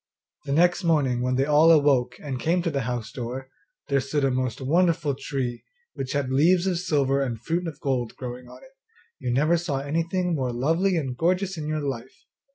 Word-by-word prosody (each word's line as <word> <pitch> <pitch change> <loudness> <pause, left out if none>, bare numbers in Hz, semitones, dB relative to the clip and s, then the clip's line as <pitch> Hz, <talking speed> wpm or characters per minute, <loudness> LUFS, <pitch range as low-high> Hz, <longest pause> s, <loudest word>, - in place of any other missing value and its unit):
The 140 - -4
next 175 +5 +3
morning 145 -7 +2
when 125 +1 0
they 135 +1 +2
all 150 +2 +5
awoke 145 -6 +4
and 135 -4 -5
came 170 +7 +1
to 170 - 0
the 140 -2 -1
house 120 -3 -4
door, 130 +1 -6 0.4
there 140 -1 +2
stood 140 +2 -1
a 135 - +2
most 130 -1 -2
wonderful 160 +1 +2
tree, 130 -3 -4 0.3
which 135 0 -4
had 140 -2 -1
leaves 170 +7 +4
of 180 -3 0
silver 140 -6 +1
and 120 -4 -2
fruit 170 +7 -2
of 160 - -7
gold 125 -4 -2
growing 125 -1 -7
on - - -14
it - - -16 0.5
you 125 - -2
never 150 +7 +3
saw 170 -5 -2
anything 165 +5 -1
more 130 -5 -1
lovely 165 +10 +1
and 130 -6 -3
gorgeous 185 +4 +1
in 155 -2 -5
your 155 0 -1
life! 130 -3 -6
140 Hz, 200 wpm, -25 LUFS, 130-165 Hz, 0.5 s, all